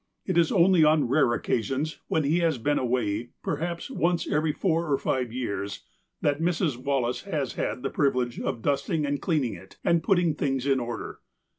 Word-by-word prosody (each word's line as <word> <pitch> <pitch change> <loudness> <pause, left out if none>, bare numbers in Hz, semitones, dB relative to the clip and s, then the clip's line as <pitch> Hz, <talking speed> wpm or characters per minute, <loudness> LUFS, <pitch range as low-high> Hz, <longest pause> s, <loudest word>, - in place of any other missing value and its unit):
It 185 - -1
is 170 -2 +4
only 180 -2 +5
on 150 -3 +4
rare 135 -2 +3
occasions, 135 +9 -2
when 160 - +1
he 155 +5 +2
has 165 -5 +1
been 145 +5 +1
away, 120 -2 -1
perhaps 170 - -3
once 175 -8 0
every 155 +1 +1
four 165 -1 0
or 140 - +3
five 125 -3 -1
years, 100 -5 -4 0.4
that 145 +1 +1
Mrs. 165 -4 +1
Wallace 125 -1 -1
has 150 -10 -2
had 125 - -3
the 135 - -2
privilege 125 -4 0
of 115 - -3
dusting 145 +2 0
and 145 0 -2
cleaning 150 - 0
it, 95 - -13
and 170 -1 +3
putting 175 -5 +2
things 135 -3 -1
in 135 -2 +3
order. 120 -1 -5
145 Hz, 180 wpm, -26 LUFS, 125-165 Hz, 0.4 s, only